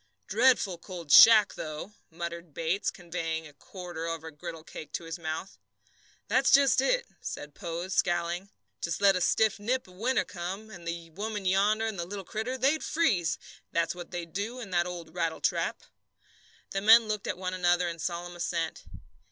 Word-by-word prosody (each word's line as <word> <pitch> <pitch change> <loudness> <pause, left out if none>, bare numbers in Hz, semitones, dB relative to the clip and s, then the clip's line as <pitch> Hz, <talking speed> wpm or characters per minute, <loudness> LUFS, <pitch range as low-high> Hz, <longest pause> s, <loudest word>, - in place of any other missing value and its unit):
"Dreadful 220 -5 +3
cold 170 -4 -8
shack, 215 +6 +9
though!" 155 +6 -6 0.2
muttered 170 -1 -7
Bates, 165 +5 0
conveying 165 -2 -4
a 150 - -12
quarter 175 +1 -7
of 165 -1 -4
a 160 - -7
griddlecake 160 0 -9
to - - -3
his 165 +1 -6
mouth. 160 +4 -5 0.7
"That's 265 +1 +3
just 275 -1 +6
it," - - +2 0.2
said 145 0 -6
Pose, 175 +1 -5
scowling. 175 +2 0 0.3
"Just 170 -1 -2
let 200 -1 +5
a 180 - 0
stiff 220 +2 +2
nip 250 +4 -1
of 185 - -16
winter 240 +8 0
come, 190 +5 -6
and 175 -4 -10
the 170 -1 -5
woman 210 +3 -4
yonder 205 +4 +3
and 220 -4 -3
the 170 - -3
little 195 0 -6
critter, 220 +7 -3
they'd 275 +5 +2
freeze, 185 - +1 0.3
that's 170 0 +1
what 175 -1 -9
they'd 170 -2 -6
do, 220 +6 -3
in 210 -6 -8
that 175 -1 +2
old 170 -2 -7
rattletrap." 165 -2 -1 0.9
The 195 - -1
men 225 +2 +7
looked 210 -2 -3
at - - -2
one 185 0 -3
another 175 -1 +2
in 170 -1 -5
solemn 175 +1 -4
assent. 170 -1 -3
180 Hz, 175 wpm, -29 LUFS, 170-210 Hz, 0.9 s, shack